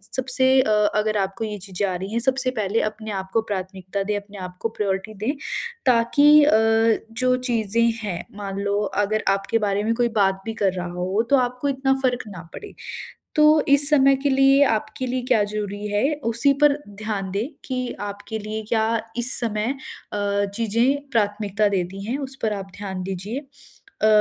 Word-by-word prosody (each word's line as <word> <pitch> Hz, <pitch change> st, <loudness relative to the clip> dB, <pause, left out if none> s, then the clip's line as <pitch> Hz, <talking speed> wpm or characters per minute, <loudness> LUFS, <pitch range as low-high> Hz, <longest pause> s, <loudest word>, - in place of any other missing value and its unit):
सबसे 260 Hz, 0 st, +1 dB
अ, 255 Hz, -, -1 dB, 0.3 s
अगर 215 Hz, 0 st, +1 dB
आपको 195 Hz, +2 st, -2 dB
ये 210 Hz, -1 st, -4 dB
चीज़ें 195 Hz, +1 st, -3 dB
आ 185 Hz, -, -2 dB
रही 190 Hz, +3 st, -5 dB
हैं, 235 Hz, -, +1 dB
सबसे 260 Hz, +1 st, +1 dB
पहले 205 Hz, +3 st, 0 dB
अपने 215 Hz, 0 st, -8 dB
आपको 190 Hz, +2 st, -1 dB
प्राथमिकता 190 Hz, -1 st, -4 dB
दें 210 Hz, +1 st, -1 dB
अपने 205 Hz, 0 st, -10 dB
आपको 185 Hz, +3 st, -5 dB
प्रायोरिटी 200 Hz, -1 st, -2 dB
दें 265 Hz, -, +2 dB, 0.6 s
ताकि 285 Hz, +5 st, +6 dB
अ, 295 Hz, -, +4 dB, 0.6 s
जो 255 Hz, +2 st, +1 dB
चीज़ें 230 Hz, -3 st, 0 dB, 0.2 s
हैं 190 Hz, -5 st, -4 dB
मान 195 Hz, -1 st, -5 dB
लो 200 Hz, 0 st, 0 dB, 0.2 s
अगर 215 Hz, +1 st, -1 dB
आपके 195 Hz, +3 st, +1 dB
बारे 205 Hz, -1 st, 0 dB
में 225 Hz, +2 st, +1 dB
कोई 240 Hz, 0 st, +1 dB
बात 195 Hz, -1 st, +2 dB
भी 225 Hz, -, -3 dB
कर 195 Hz, -4 st, +1 dB
रहा 180 Hz, -1 st, -4 dB
हो 180 Hz, +4 st, -1 dB
तो 280 Hz, -, +5 dB
आपको 250 Hz, +2 st, -1 dB
इतना 270 Hz, 0 st, +1 dB
फ़र्क 250 Hz, -1 st, +1 dB
ना 185 Hz, -5 st, -8 dB
पड़े। 415 Hz, -, -9 dB, 0.6 s
तो 305 Hz, -1 st, +5 dB, 0.2 s
इस 285 Hz, +1 st, +6 dB
समय 275 Hz, -2 st, +5 dB
के 285 Hz, -, +2 dB
लिए 270 Hz, +1 st, +5 dB
आपके 225 Hz, +3 st, -2 dB
लिए 255 Hz, +1 st, -1 dB
क्या 235 Hz, -5 st, +4 dB
ज़रूरी 205 Hz, 0 st, -4 dB
है 210 Hz, +9 st, +1 dB, 0.2 s
उसी 275 Hz, +5 st, +3 dB
पर 290 Hz, -1 st, +5 dB, 0.3 s
ध्यान 200 Hz, -3 st, -3 dB
दें 205 Hz, +5 st, -1 dB, 0.2 s
कि 260 Hz, -, -3 dB, 0.3 s
आपके 205 Hz, +2 st, -6 dB
लिए 215 Hz, +1 st, -5 dB
क्या 220 Hz, -1 st, +2 dB, 0.3 s
इस 240 Hz, +1 st, +5 dB
समय 225 Hz, +2 st, -1 dB, 0.4 s
अ, 205 Hz, 0 st, 0 dB
चीज़ें 235 Hz, +6 st, +1 dB
प्राथमिकता 210 Hz, -2 st, +1 dB
देती 195 Hz, 0 st, -2 dB
हैं 240 Hz, +5 st, -2 dB
उस 270 Hz, -1 st, -5 dB
पर 215 Hz, -1 st, +1 dB
आप 195 Hz, -1 st, -6 dB
ध्यान 190 Hz, -2 st, -5 dB
दीजिए। 195 Hz, +7 st, -4 dB, 0.6 s
अ, -, -, +6 dB
215 Hz, 180 wpm, -23 LUFS, 200-255 Hz, 0.6 s, ताकि